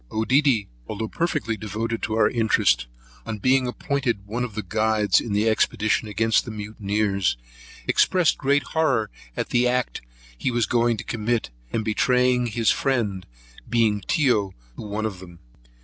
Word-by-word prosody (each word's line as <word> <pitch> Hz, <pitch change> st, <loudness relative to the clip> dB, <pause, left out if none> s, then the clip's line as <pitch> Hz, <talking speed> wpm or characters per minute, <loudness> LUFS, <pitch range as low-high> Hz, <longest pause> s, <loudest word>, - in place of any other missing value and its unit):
Oedidy, 120 Hz, 0 st, +2 dB, 0.2 s
although 110 Hz, -, -4 dB
perfectly 115 Hz, -7 st, -1 dB
devoted 110 Hz, +2 st, -4 dB
to 110 Hz, -, -2 dB
our 110 Hz, -1 st, +4 dB
interest, 110 Hz, -, +2 dB, 0.4 s
on 110 Hz, -2 st, -5 dB
being 130 Hz, +4 st, +2 dB
appointed 125 Hz, -5 st, -2 dB
one 115 Hz, +4 st, -3 dB
of 115 Hz, -4 st, -5 dB
the 110 Hz, -, -3 dB
guides 110 Hz, +2 st, +2 dB
in 115 Hz, -, -6 dB
the 105 Hz, +2 st, +1 dB
expedition 110 Hz, 0 st, +1 dB
against 110 Hz, +2 st, +2 dB
the -, -, -8 dB
mutineers, 105 Hz, -, -1 dB, 0.5 s
expressed 180 Hz, -4 st, +3 dB
great 140 Hz, +1 st, +2 dB
horror 135 Hz, -10 st, 0 dB, 0.3 s
at -, -, -2 dB
the 125 Hz, 0 st, +3 dB
act 125 Hz, 0 st, -1 dB, 0.3 s
he -, -, -1 dB
was 120 Hz, -2 st, +1 dB
going 120 Hz, +2 st, +1 dB
to -, -, -5 dB
commit, 115 Hz, -, -2 dB, 0.2 s
in 110 Hz, -, -1 dB
betraying 125 Hz, +3 st, +2 dB
his 115 Hz, 0 st, +2 dB
friend, 110 Hz, -9 st, -1 dB, 0.4 s
being 110 Hz, -3 st, +2 dB
Tyo 120 Hz, -, +2 dB, 0.2 s
to -, -, -8 dB
one 105 Hz, +1 st, -3 dB
of 100 Hz, -4 st, -4 dB
them. 85 Hz, -2 st, -12 dB
110 Hz, 155 wpm, -24 LUFS, 105-125 Hz, 0.5 s, our